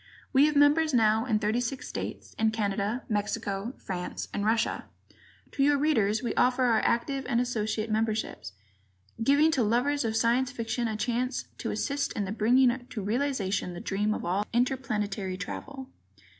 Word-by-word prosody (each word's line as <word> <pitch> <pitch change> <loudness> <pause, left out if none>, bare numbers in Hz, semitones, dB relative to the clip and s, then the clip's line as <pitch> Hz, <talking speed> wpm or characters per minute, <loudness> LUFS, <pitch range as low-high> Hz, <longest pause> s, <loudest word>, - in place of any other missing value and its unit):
We 280 +2 +6
have 300 - -1
members 290 +1 +4
now 220 0 +3
in 220 -3 +2
thirty 215 +3 0
six 260 +3 -4
states, - - -6
in 220 0 +3
Canada, 210 +2 -1
Mexico, 205 +1 -2
France 180 -2 -5
and 205 - -2
Russia. 220 +1 0 0.7
To - - -3
your 285 +1 +4
readers 225 -7 +2
we 240 - -1
offer 250 +1 +2
our 230 -3 +4
active 270 +3 0
and 240 -2 +2
associate 220 -2 -1
memberships, 220 - -2 0.7
giving 285 +6 +4
to 270 - +1
lovers 250 +6 +1
of 220 -1 -1
Science 240 +3 +2
Fiction 230 0 -2
a 215 -1 -3
chance 245 +3 -1 0.2
to - - -3
assist 280 0 -1
in 205 - -2
the 190 - -4
bringing 240 +3 +4
to 215 -5 -6
realization 210 -6 -1
the - - -6
dream 210 +3 -1
of - - -5
all 190 +4 0
interplanetary 210 -6 -1
travel. 270 +6 -7
230 Hz, 165 wpm, -28 LUFS, 210-260 Hz, 0.7 s, We